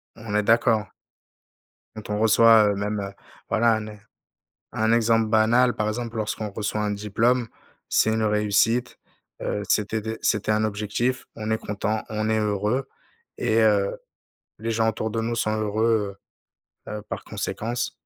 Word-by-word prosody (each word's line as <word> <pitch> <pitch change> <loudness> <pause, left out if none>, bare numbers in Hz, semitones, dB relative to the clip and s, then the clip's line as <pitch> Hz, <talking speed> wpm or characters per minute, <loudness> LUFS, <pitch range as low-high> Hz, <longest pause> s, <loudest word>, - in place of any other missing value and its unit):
On 110 -2 -7
est 105 - +2
d'accord. 110 -2 +3 1.1
Quand 110 -1 -9
on 105 0 -1
reçoit, 110 0 +6
heu, - - -2
même, 105 +1 -2
heu, 100 0 -5 0.4
voilà, 115 0 +3
un 110 -1 -4
e 105 - -10 0.8
un 110 +1 +2
exemple 115 -1 +3
banal, 115 +3 +4
par 105 - -1
exemple 115 +1 -4
lorsqu'on 105 0 -3
reçoit 105 +1 -3
un 105 0 0
diplôme. 110 +4 +1 0.4
C'est 110 - +3
une 110 0 0
réussite, 105 +3 +1 0.4
heu, 105 - -2
c'était 110 +1 +1
dé 110 +1 -5
c'était 105 0 +1
un 110 0 +2
objectif, 110 +4 -2
on 110 0 -4
est 110 - +1
content, 105 +1 -2
on 110 0 -2
est 110 - +2
heureux 105 +5 -1 0.5
et 115 -2 +1
heu, 105 -3 +3 0.6
les 115 +2 -3
gens 110 0 +2
autour 110 0 -3
de 115 - -1
nous 115 +1 -2
sont 110 -1 0
heureux, 105 -1 0 0.7
heu, - - -5
heu, - - -7
par - - -6
conséquence. 120 +2 -3
110 Hz, 165 wpm, -24 LUFS, 105-115 Hz, 1.1 s, reçoit